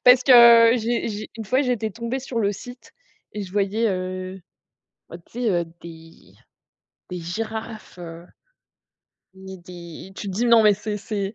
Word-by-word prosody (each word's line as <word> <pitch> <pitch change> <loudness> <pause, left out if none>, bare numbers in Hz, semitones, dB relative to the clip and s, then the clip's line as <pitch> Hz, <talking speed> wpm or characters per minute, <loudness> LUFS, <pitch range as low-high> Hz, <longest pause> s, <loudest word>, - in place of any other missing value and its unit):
Parce 250 0 +7
que 235 -3 +8
j'ai 235 +1 -1
j'ai 215 0 -6
une 220 - -6
fois, 255 +7 +1
j'étais 235 -4 -1
tombée 235 +5 -4
sur 255 -2 -5
le 205 -2 +1
site 245 +5 -12 0.4
et 210 - -5
je 185 -1 -9
voyais, 205 +3 0
heu, 185 0 -4 0.7
bah 170 - -7
tu 170 - -27
sais, 230 - +2
heu, 175 -2 +1 0.2
des 165 -1 -14 0.8
des 180 - -5
girafes, 220 +3 -6
heu 170 0 -9 1.1
ni 190 0 -10
des 175 +1 -11
tu 200 - -6
te - - -4
dis: 225 +6 0
«Non, 235 -2 +6
mais 210 -1 +5
c'est 210 +1 -5
c'est 205 0 -4
210 Hz, 170 wpm, -23 LUFS, 185-230 Hz, 1.1 s, que